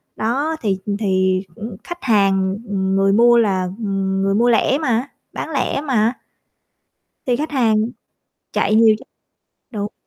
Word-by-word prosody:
Đó 275 Hz, +9 st, -1 dB
thì, 200 Hz, -4 st, 0 dB
ừm, 200 Hz, -1 st, -2 dB
thì 190 Hz, -2 st, +1 dB
cũng 225 Hz, -2 st, -7 dB
khách 345 Hz, -4 st, -8 dB
hàng, 195 Hz, -4 st, +2 dB
ừm, 190 Hz, -1 st, -1 dB
người 195 Hz, 0 st, +3 dB
mua 235 Hz, +2 st, +5 dB
là, 195 Hz, -5 st, +2 dB
ừm, 195 Hz, -3 st, -2 dB
người 195 Hz, 0 st, +1 dB
mua 240 Hz, +2 st, +3 dB
lẻ 240 Hz, +3 st, +3 dB
mà, 255 Hz, -4 st, 0 dB, 0.3 s
bán -, -, -5 dB
lẻ 280 Hz, -1 st, -1 dB
mà. 240 Hz, -5 st, +1 dB, 1.1 s
Thì 245 Hz, -2 st, +2 dB
khách 305 Hz, +5 st, -3 dB
hàng 235 Hz, -7 st, +2 dB, 0.8 s
chạy 215 Hz, -, +1 dB
nhiều 220 Hz, -1 st, +6 dB
chứ. -, -, -15 dB, 0.7 s
Đúng. 210 Hz, -1 st, -4 dB
215 Hz, 155 wpm, -19 LUFS, 195-240 Hz, 1.1 s, nhiều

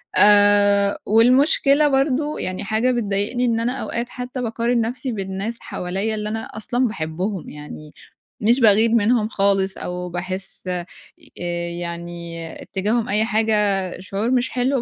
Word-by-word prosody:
آآ 205 Hz, -1 st, +5 dB
والمشكلة 275 Hz, +6 st, +4 dB
برضه 280 Hz, +2 st, +1 dB
يعني 185 Hz, +1 st, -4 dB
حاجة 220 Hz, +5 st, +1 dB
بتضايقني 225 Hz, +1 st, -1 dB
إن 230 Hz, -1 st, +1 dB
أنا 240 Hz, +2 st, 0 dB
أوقات 235 Hz, +1 st, -3 dB
حتّى 250 Hz, +1 st, -6 dB
باقارن 235 Hz, 0 st, 0 dB
نفْسي 245 Hz, +3 st, -3 dB
بالناس 195 Hz, +2 st, -4 dB
حواليّا 195 Hz, +5 st, -3 dB
اللي 210 Hz, 0 st, -3 dB
أنا 225 Hz, +1 st, -2 dB, 0.2 s
أصلًا 245 Hz, +3 st, 0 dB
باحبهم، 180 Hz, 0 st, -4 dB
يعني 150 Hz, 0 st, -10 dB, 0.5 s
مش 235 Hz, +5 st, +3 dB
باغير 220 Hz, 0 st, +5 dB
منهم 225 Hz, 0 st, +3 dB
خالص 195 Hz, -2 st, +1 dB
أو 180 Hz, 0 st, -5 dB
باحس 185 Hz, +2 st, -3 dB
ي -, -, -1 dB, 0.7 s
آآ 175 Hz, 0 st, -3 dB
يعني 170 Hz, -1 st, -6 dB, 0.2 s
اتجاههم 220 Hz, +5 st, -1 dB
أي 210 Hz, +2 st, +2 dB
حاجة 220 Hz, 0 st, +1 dB, 0.5 s
شعور 200 Hz, +5 st, -2 dB
مش 255 Hz, 0 st, +1 dB
حلو، 255 Hz, 0 st, 0 dB
215 Hz, 140 wpm, -21 LUFS, 190-240 Hz, 0.7 s, آآ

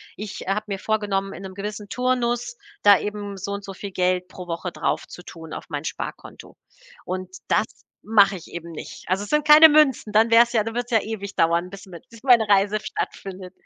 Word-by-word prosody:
ich, 210 Hz, 0 st, -7 dB
äh, -, -, -5 dB
habe 210 Hz, +2 st, -1 dB
mir 200 Hz, -1 st, -3 dB
vorgenommen, 200 Hz, -2 st, -1 dB
in 175 Hz, -, -9 dB
'nem 190 Hz, -1 st, -9 dB
gewissen 205 Hz, 0 st, -6 dB
Turnus 250 Hz, -, -1 dB, 0.3 s
da 205 Hz, -2 st, +7 dB
eben 205 Hz, -1 st, -5 dB
so 200 Hz, +2 st, -5 dB
und 200 Hz, 0 st, -5 dB
so 195 Hz, -, -7 dB
viel 200 Hz, +1 st, -8 dB
Geld 180 Hz, 0 st, 0 dB
pro 180 Hz, -1 st, -10 dB
Woche 170 Hz, +1 st, -4 dB
draufzutun 165 Hz, -2 st, -5 dB
auf -, -, -7 dB
mein 145 Hz, +1 st, -4 dB
Sparkonto. -, -, -7 dB, 0.5 s
Und 185 Hz, 0 st, -5 dB
das 210 Hz, -, +2 dB, 0.4 s
mache 205 Hz, -2 st, +4 dB
ich 175 Hz, -, -10 dB
eben 170 Hz, 0 st, -7 dB
nicht. -, -, -9 dB
Also, 190 Hz, +2 st, 0 dB
es -, -, -9 dB
sind 300 Hz, 0 st, +1 dB
keine 305 Hz, +1 st, +10 dB
Münzen, 280 Hz, -8 st, +3 dB
dann 225 Hz, +2 st, +4 dB
wäre 230 Hz, +1 st, +8 dB
es 235 Hz, -, -9 dB
ja 220 Hz, -2 st, +3 dB
dann 225 Hz, +1 st, -6 dB
wird's 245 Hz, 0 st, -3 dB
ja 225 Hz, -2 st, +4 dB
ewig 200 Hz, -2 st, -6 dB
dauern, 170 Hz, +2 st, +1 dB
bis 195 Hz, 0 st, -11 dB
mit 175 Hz, -2 st, -12 dB
bis 230 Hz, -2 st, -15 dB
meine 240 Hz, -5 st, +5 dB
Reise 205 Hz, +1 st, +3 dB
stattfindet. 185 Hz, -2 st, -6 dB
200 Hz, 210 wpm, -23 LUFS, 185-225 Hz, 0.5 s, keine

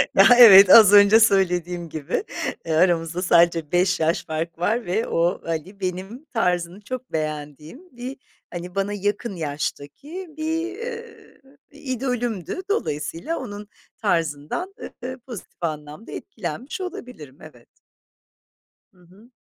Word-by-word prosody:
Ya, -, -, +7 dB
evet, 200 Hz, -5 st, +10 dB
az 210 Hz, -2 st, +9 dB
önce 205 Hz, +2 st, +7 dB
söylediğim 180 Hz, -5 st, +1 dB
gibi, 155 Hz, -, -3 dB, 0.4 s
eee, 165 Hz, -, -2 dB
aramızda 170 Hz, 0 st, +1 dB
sadece 170 Hz, -3 st, +3 dB
5 185 Hz, +1 st, +2 dB
yaş 160 Hz, +2 st, 0 dB
fark 160 Hz, +1 st, -4 dB
var 225 Hz, +6 st, 0 dB
ve 200 Hz, +6 st, -1 dB
o, 170 Hz, +2 st, 0 dB
hani, 165 Hz, +5 st, -5 dB
benim 190 Hz, -, -5 dB
tarzını 180 Hz, -, -1 dB
çok 255 Hz, +3 st, -7 dB
beğendiğim 155 Hz, -, -6 dB
bir, 255 Hz, +3 st, -6 dB, 0.4 s
hani, 175 Hz, +1 st, -7 dB
bana 195 Hz, +1 st, -1 dB
yakın 205 Hz, +1 st, -3 dB
yaştaki 155 Hz, -, -5 dB
bir, 330 Hz, +5 st, -3 dB
ııı, 465 Hz, -2 st, -9 dB, 0.3 s
idolümdü. 250 Hz, -, -3 dB
Dolayısıyla 245 Hz, -, -2 dB
onun 205 Hz, -4 st, -8 dB, 0.3 s
tarzından, 165 Hz, -, -2 dB, 0.3 s
eee, 255 Hz, +1 st, -5 dB
pozitif 235 Hz, -7 st, -10 dB
anlamda 150 Hz, +4 st, -5 dB
etkilenmiş 225 Hz, -, -6 dB
olabilirim, 250 Hz, -, -8 dB
evet. -, -, -15 dB, 1.3 s
Hı 185 Hz, -, -30 dB
hı. 190 Hz, +7 st, -20 dB
190 Hz, 120 wpm, -23 LUFS, 165-245 Hz, 1.3 s, evet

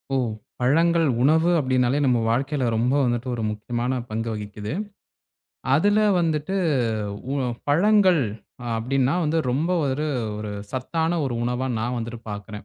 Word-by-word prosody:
ஓ! -, -, +3 dB, 0.4 s
பழங்கள் 165 Hz, +5 st, +3 dB
உணவு 160 Hz, +5 st, +4 dB
அப்படின்னாலே 130 Hz, -1 st, +2 dB
நம்ம 125 Hz, -2 st, +3 dB
வாழ்க்கையில 135 Hz, +2 st, 0 dB
ரொம்ப 120 Hz, +4 st, +1 dB
வந்துட்டு 120 Hz, 0 st, -1 dB
ஒரு 115 Hz, -2 st, -3 dB
முக்கியமான 120 Hz, +4 st, -2 dB
பங்கு 115 Hz, +1 st, -3 dB
வகிக்குது. 105 Hz, 0 st, -6 dB, 1.0 s
அதுல 205 Hz, +8 st, +3 dB, 0.2 s
வந்துட்டு 160 Hz, +2 st, -1 dB, 0.8 s
உ 140 Hz, -, 0 dB, 0.3 s
பழங்கள் 185 Hz, +2 st, +4 dB, 0.5 s
அ -, -, -5 dB
அப்படின்னா 130 Hz, +4 st, +1 dB
வந்து 155 Hz, +2 st, +1 dB
ரொம்ப 150 Hz, +7 st, 0 dB
ஒரு 140 Hz, +3 st, -1 dB, 0.3 s
ஒரு 105 Hz, -1 st, -5 dB, 0.2 s
சத்தான 160 Hz, +6 st, -1 dB
ஒரு 130 Hz, -3 st, -2 dB
உணவா 125 Hz, +2 st, -1 dB
நான் 120 Hz, +3 st, -2 dB
வந்துட்டு 115 Hz, 0 st, -6 dB
பாக்குறேன். 105 Hz, 0 st, -7 dB
130 Hz, 135 wpm, -24 LUFS, 120-155 Hz, 1.0 s, உணவு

